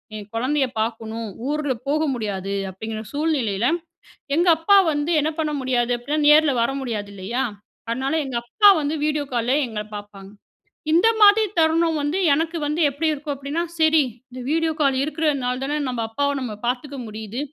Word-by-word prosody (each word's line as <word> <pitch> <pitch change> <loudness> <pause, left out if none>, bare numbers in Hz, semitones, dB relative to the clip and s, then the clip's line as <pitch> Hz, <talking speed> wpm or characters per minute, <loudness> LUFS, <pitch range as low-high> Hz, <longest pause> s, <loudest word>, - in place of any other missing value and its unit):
என் 210 -1 -8
குழந்தைய 265 +4 +1
பார்க்கணும் 225 0 -4 0.2
ஊரில 295 -2 0 0.2
போக 305 +2 +1
முடியாது 200 -4 -3 0.2
அப்டிங்கிற 220 +3 -6
சூழ்நிலையில, 260 -9 0 0.7
எங்க 345 +2 +2
அப்பா 365 +5 +5
வந்து 295 +2 -1
என்ன 310 +2 0
பண்ண 305 -1 0
முடியாது 250 -2 0
அப்டின்னா 290 +6 -2
நேரில 300 -1 +6
வர 235 - +1
முடியாது 215 -5 -4
இல்லையா? 215 +7 -2 0.4
அதனால 265 +4 -1
எங்க 260 -3 -3
அப்பா 410 - +5
வந்து 295 +2 -1
வீடியோ 300 -1 0
கால்ல 240 +2 +1
எங்கள 220 -2 -4 0.2
பார்ப்பாங்க. 200 -1 -11 0.6
இந்த 345 +7 +5
மாதிரி 420 +1 +7
தருணம் 325 0 +3
வந்து 290 +5 -1 0.2
எனக்கு 325 +3 -1
வந்து 300 +3 -1
எப்படி 285 +4 -2
இருக்கும் 295 0 -4
அப்டின்னா, 280 +5 -3 0.2
சரி 315 -1 +5 0.3
இந்த 255 0 -8
வீடியோ 325 0 +1
கால் 275 -2 +3
இருக்கிறதுனால 285 -5 -1
தானே 290 +2 -1
நம்ம 245 -3 -2
அப்பாவ 285 +5 0
நம்ம 245 -4 -4
பார்த்துக்க 265 +3 -3
முடியுது. 215 +2 -6
275 Hz, 160 wpm, -22 LUFS, 230-310 Hz, 0.7 s, மாதிரி